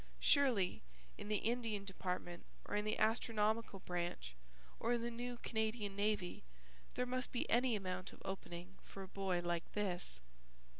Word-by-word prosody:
Surely 250 -11 +4 0.3
in - - -7
the 210 0 +3
Indian 225 -3 0
Department 180 -2 -3 0.2
or - - -2
in 210 0 +2
the 215 - +1
Astronomical 220 -2 +2
Branch 175 - -2 0.5
or 235 +2 +2
in 235 -1 +1
the 240 - -1
New 245 +1 -3
Canadian 220 -3 -1
Navy 205 -3 +1 0.5
there 250 - +2
must 255 0 -1
be 245 - 0
any 245 0 +5
amount 185 -1 -2
of - - -13
opening 185 -1 -5
for 195 - -7
a - - -7
boy 185 -2 0
like 175 -1 -1
this? 180 - -1
205 Hz, 155 wpm, -40 LUFS, 185-230 Hz, 0.5 s, any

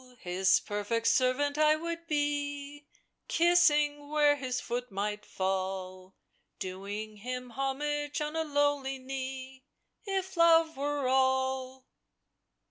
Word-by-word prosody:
His 185 +2 +3
perfect 210 +3 -2
servant 285 +4 +2
I 305 0 +5
would 335 +1 -5
be, 290 -1 -2 0.4
Kissing 300 -4 +4
v^iere 290 0 +3
his 255 -3 -3
foot 245 +1 -4
might 210 +1 -3
fall, 185 0 -3 0.4
Doing 200 +3 -6
him 250 +3 -5
homage 290 +3 -2
on 300 +1 -3
a 320 - +1
lowly 290 -2 0
knee, 260 0 -6 0.4
If 385 -2 -3
Love 330 -1 +5
were 285 0 -1
all 260 0 +1
270 Hz, 110 wpm, -30 LUFS, 235-295 Hz, 0.4 s, I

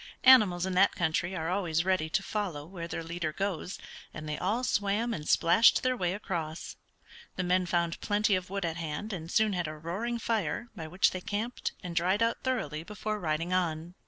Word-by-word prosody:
Animals 210 -9 +7
in 190 - -2
that 190 +2 +4
country 175 +2 0
are 165 0 -2
always 175 -3 0
ready 185 -4 +1
to - - 0
follow 185 -9 -3
where 170 -1 -7
their 165 -1 -4
leader 165 -1 -3
goes, 190 +1 -3 0.4
and 155 -1 -6
they 150 - -2
all 210 +10 -1
swam 210 +1 +1
and 150 -7 -5
splashed 220 +7 +5
their 255 0 +2
way 180 -5 -1
across. 170 -6 -4 0.6
The 185 - -1
men 180 0 +2
found 170 -1 0
plenty 210 0 +2
of 185 -1 -1
wood 195 -1 -2
at 165 -1 -2
hand, 165 +6 -4
and 165 -3 -6
soon 215 +2 +2
had 175 -3 -1
a 155 0 -6
roaring 195 +10 -3
fire, 225 -1 -1
by 160 -5 -6
which 180 +4 +3
they 185 - -5
camped, 220 +6 -3
and 175 -2 -5
dried 185 +6 +2
out 230 0 0
thoroughly 190 - -2
before 210 +3 -4
riding 165 0 -1
on. 170 -2 -1
180 Hz, 200 wpm, -30 LUFS, 165-205 Hz, 0.6 s, Animals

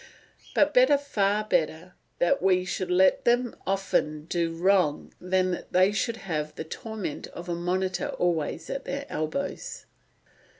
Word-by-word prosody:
But - - +4
better, - - +6
far 210 -7 0
better, 165 -3 -1 0.2
that 175 - +2
we 185 -1 +3
should 185 0 -3
let 185 +1 +4
them 245 0 +2
often 170 -6 0
do 170 0 -1
wrong 180 -4 +2
than 185 0 +1
that 175 - -6
they 185 +2 +5
should 225 +2 -1
have 155 -4 -3
the - - -4
torment 205 0 -6
of 175 0 -9
a 175 - -1
monitor 180 +2 -1
always 165 -2 -1
at 270 - -4
their 280 0 -4
elbows." 155 - -4
185 Hz, 145 wpm, -27 LUFS, 170-205 Hz, 0.2 s, better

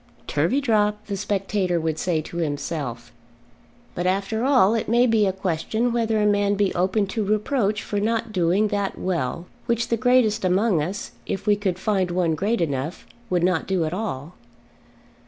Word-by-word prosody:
"Turveydrop!" 210 - +2
the 200 - -3
spectator 195 -2 -1
would 160 -1 -2
say 170 -4 0
to 170 - -8
himself. 145 -6 -3 0.8
But 175 +1 -2
after 200 +4 0
all 250 -7 +4
it 225 -2 -1
may 240 +2 +4
be 220 -4 +3
a - - +2
question 190 +6 -1
whether 225 -2 +1
a 210 - +2
man 205 0 +2
be 200 -1 +1
open 185 +4 +1
to 210 +3 -2
reproach 210 +1 0
for 205 - -2
not 225 +1 -1
doing 190 +2 +2
that 200 -2 -2
well 170 -2 -2 0.2
which 235 0 0
the 230 - +1
greatest 240 -3 +3
among 185 -1 +2
us, 185 +7 -4 0.2
if 195 - -3
we 210 -1 +4
could 195 -3 -2
find 190 -2 0
one 175 -2 +1
great 205 +8 0
enough, 145 +1 -2 0.2
would 180 -2 +1
not 180 -2 +1
do 185 -4 +1
at 155 - -3
all. 180 -6 -4
195 Hz, 175 wpm, -23 LUFS, 175-215 Hz, 0.8 s, all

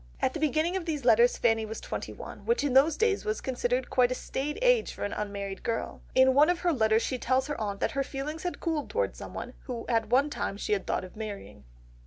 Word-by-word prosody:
At 260 - +1
the 320 - -4
beginning 310 +4 +1
of 375 -3 -2
these 300 -6 -3
letters 235 0 +5
Fanny 225 -2 +2
was 220 +1 -5
twenty - - -5
one, - - -9
which 470 -5 +1
in 285 -3 0
those 285 +4 +5
days 440 -2 +2
was 430 0 -1
considered 250 0 -1
quite 250 -1 +4
a - - 0
staid 285 +4 -3
age - - +3
for - - -6
an 205 - -2
unmarried 200 -2 -4
girl. 230 -1 -3
In 260 0 +6
one 295 +4 +6
of 355 -1 +1
her 350 -2 +2
letters 220 -3 +3
she 255 - -2
tells 260 +2 +1
her 295 -5 -4
aunt 200 -2 -3
that - - +1
her 275 - -1
feelings 290 +4 -5
had 355 - -4
cooled 320 -4 -2
towards - - -1
someone, - - -7
who 240 -3 -5
at 230 -2 +1
one 280 +4 +3
time 195 - -3
she 210 - -1
had 195 -2 -1
thought - - 0
of 185 - -11
marrying. 200 - -7
260 Hz, 245 wpm, -29 LUFS, 225-310 Hz, -, In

